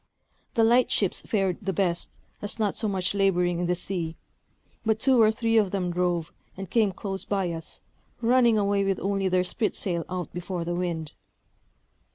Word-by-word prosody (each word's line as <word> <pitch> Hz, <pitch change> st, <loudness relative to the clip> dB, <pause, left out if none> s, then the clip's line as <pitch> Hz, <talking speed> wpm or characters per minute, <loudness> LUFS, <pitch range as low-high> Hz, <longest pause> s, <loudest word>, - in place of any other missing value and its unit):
The 230 Hz, -, +4 dB
light 240 Hz, +3 st, +4 dB
ships 195 Hz, -4 st, +1 dB
fared 195 Hz, -5 st, 0 dB
the 195 Hz, -2 st, -2 dB
best, 175 Hz, -1 st, 0 dB, 0.3 s
as 205 Hz, -, -4 dB
not 210 Hz, -3 st, 0 dB
so 220 Hz, -, -1 dB
much 190 Hz, -2 st, -1 dB
laboring 180 Hz, -3 st, +2 dB
in 175 Hz, -, 0 dB
the 180 Hz, -, +1 dB
sea; 175 Hz, -3 st, -3 dB, 0.7 s
but 220 Hz, -1 st, +2 dB
two 255 Hz, 0 st, +4 dB
or 215 Hz, -1 st, +6 dB
three 225 Hz, 0 st, +1 dB
of 210 Hz, -3 st, +4 dB
them 180 Hz, -2 st, -1 dB
drove, 175 Hz, -2 st, -1 dB, 0.2 s
and 195 Hz, -2 st, -7 dB
came 220 Hz, -4 st, +3 dB
close 195 Hz, 0 st, -4 dB
by 195 Hz, -4 st, -1 dB
us, 165 Hz, -1 st, -7 dB, 0.4 s
running 240 Hz, -1 st, +4 dB
away 200 Hz, -1 st, +2 dB
with 195 Hz, -1 st, 0 dB
only 195 Hz, 0 st, 0 dB
their 185 Hz, 0 st, +2 dB
spritsail 180 Hz, -4 st, -1 dB
out 180 Hz, -1 st, -4 dB
before 175 Hz, 0 st, -4 dB
the 175 Hz, -, -2 dB
wind. 170 Hz, -3 st, -2 dB
195 Hz, 180 wpm, -26 LUFS, 175-215 Hz, 0.7 s, or